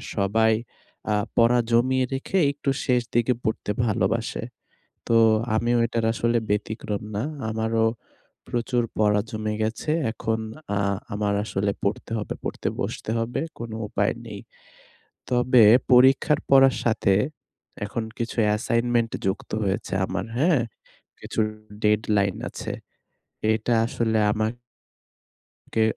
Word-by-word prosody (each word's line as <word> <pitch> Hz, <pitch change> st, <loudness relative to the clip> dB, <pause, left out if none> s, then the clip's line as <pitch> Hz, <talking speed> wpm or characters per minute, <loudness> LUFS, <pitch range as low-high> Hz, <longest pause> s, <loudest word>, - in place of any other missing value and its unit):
সবাই 110 Hz, +2 st, +3 dB, 0.6 s
আ -, -, +3 dB, 0.2 s
পড়া 120 Hz, +1 st, +5 dB
জমিয়ে 130 Hz, +2 st, +3 dB
রেখে 140 Hz, +8 st, -2 dB
একটু 140 Hz, -1 st, -3 dB, 0.2 s
শেষ 125 Hz, -2 st, +3 dB
দিকে 120 Hz, +2 st, +3 dB
পড়তে 110 Hz, -1 st, -1 dB
ভালোবাসে। 115 Hz, +2 st, 0 dB, 0.6 s
তো, 115 Hz, -, +4 dB, 0.4 s
আমিও 120 Hz, +2 st, +2 dB
এটার 115 Hz, -1 st, -1 dB
আসলে 115 Hz, 0 st, +1 dB
ব্যতিক্রম 105 Hz, 0 st, -2 dB
না। 105 Hz, -, -1 dB, 0.3 s
আমারও 110 Hz, 0 st, 0 dB, 0.6 s
প্রচুর 120 Hz, 0 st, 0 dB
পড়া 105 Hz, -1 st, +3 dB
জমে 110 Hz, -1 st, -3 dB
গেছে। 110 Hz, +7 st, -1 dB, 0.2 s
এখন 110 Hz, 0 st, -2 dB, 0.4 s
আ -, -, +1 dB, 0.3 s
আমার 105 Hz, 0 st, 0 dB
আসলে 100 Hz, -1 st, -1 dB
পড়তে 100 Hz, +3 st, -2 dB
হবে। 105 Hz, -, -4 dB
পড়তে -, -, -3 dB
বসতে 110 Hz, -, -3 dB
হবে। 120 Hz, +4 st, -2 dB, 0.2 s
কোনো 115 Hz, -2 st, -5 dB
উপায় 100 Hz, 0 st, 0 dB
নেই। 105 Hz, -3 st, -7 dB, 0.9 s
তবে 125 Hz, -2 st, +5 dB, 0.3 s
পরীক্ষার 135 Hz, +4 st, +5 dB
পড়ার 135 Hz, -1 st, +6 dB
সাথে 110 Hz, -4 st, +2 dB, 0.7 s
এখন 110 Hz, +2 st, -3 dB
কিছু 115 Hz, +1 st, -3 dB
অ্যাসাইনমেন্ট 115 Hz, +2 st, +1 dB
যুক্ত 95 Hz, +1 st, -2 dB
হয়েছে 95 Hz, 0 st, -2 dB
আমার, -, -, -3 dB
হ্যাঁ? 155 Hz, -3 st, +3 dB, 0.6 s
কিছু -, -, -3 dB, 0.4 s
ডেডলাইন 105 Hz, -2 st, +2 dB
আছে। -, -, -6 dB, 0.8 s
এটা 115 Hz, +2 st, 0 dB
আসলে 110 Hz, -2 st, 0 dB
আমাক 110 Hz, +2 st, -1 dB, 1.2 s
কে 110 Hz, -, +3 dB
115 Hz, 120 wpm, -24 LUFS, 105-120 Hz, 1.2 s, পড়ার